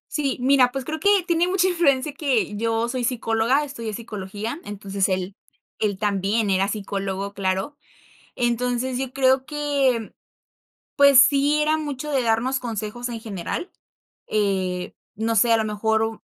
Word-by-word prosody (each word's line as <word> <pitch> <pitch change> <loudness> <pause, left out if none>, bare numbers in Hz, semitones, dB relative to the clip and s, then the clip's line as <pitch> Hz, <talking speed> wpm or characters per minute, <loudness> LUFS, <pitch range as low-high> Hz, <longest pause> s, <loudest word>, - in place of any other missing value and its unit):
Sí, 280 -3 0
mira, 255 -1 +4
pues, 270 -1 -4
creo 315 +2 -4
que 405 - +3 0.2
tiene 340 0 +2
mucha 370 0 +2
influencia 300 -6 +2
que 265 -8 0
yo 225 +2 0
soy 250 0 -3
psicóloga, 235 +3 +1
estudié 235 -7 -6
psicología, 210 - -6
entonces, 200 -1 -2
él 185 +1 -2 0.4
él 205 -3 0
también 205 +1 0
era 190 +1 +2
psicólogo, 200 -1 -4
claro. 190 +7 -2 0.6
Entonces, 245 +1 -1
yo 265 -1 -4
creo 265 0 +2
que, 280 -6 0 0.8
pues, 280 -2 +6
sí, 280 +2 +5
era 305 +1 +2
mucho 300 -1 -4
de 270 -2 +2
darnos 240 +3 +1
consejos 230 +1 -4
en 235 -1 -5
general. 220 - -5 0.5
Eh, 190 -4 -1 0.2
no 225 +2 -1
sé, 230 +2 +4
a - - +6
lo 220 - 0
mejor 220 +1 0
u 225 0 -3
235 Hz, 150 wpm, -23 LUFS, 210-275 Hz, 0.8 s, pues